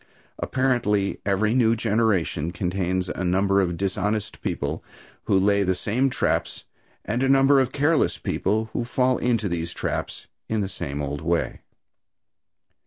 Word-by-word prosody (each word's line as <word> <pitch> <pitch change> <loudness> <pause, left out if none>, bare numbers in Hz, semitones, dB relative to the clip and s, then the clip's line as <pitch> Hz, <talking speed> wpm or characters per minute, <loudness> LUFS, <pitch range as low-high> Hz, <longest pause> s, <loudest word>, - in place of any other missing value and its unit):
Apparently, 120 -7 0
every 105 +3 +2
new 115 -3 +3
generation 105 -8 0
contains 90 0 -1
a 90 +1 -4
number 100 +2 +2
of 85 -2 -1
dishonest 105 +3 -2
people 80 -6 -3 0.4
who 95 - +3
lay 100 +1 +3
the 95 -1 +1
same 120 +8 0
traps, - - -1 0.4
and 115 +4 -1
a 135 - +2
number 135 +1 +5
of 130 -1 +1
careless 145 +3 +2
people 110 +2 -1
who 120 - -1
fall 125 +1 +1
into 115 -4 +1
these 85 -2 -3
traps - - -4 0.2
in 110 -1 0
the 100 - -1
same 75 -6 -4
old 70 +1 -4
way. 85 +1 -1
100 Hz, 145 wpm, -24 LUFS, 90-120 Hz, 0.4 s, number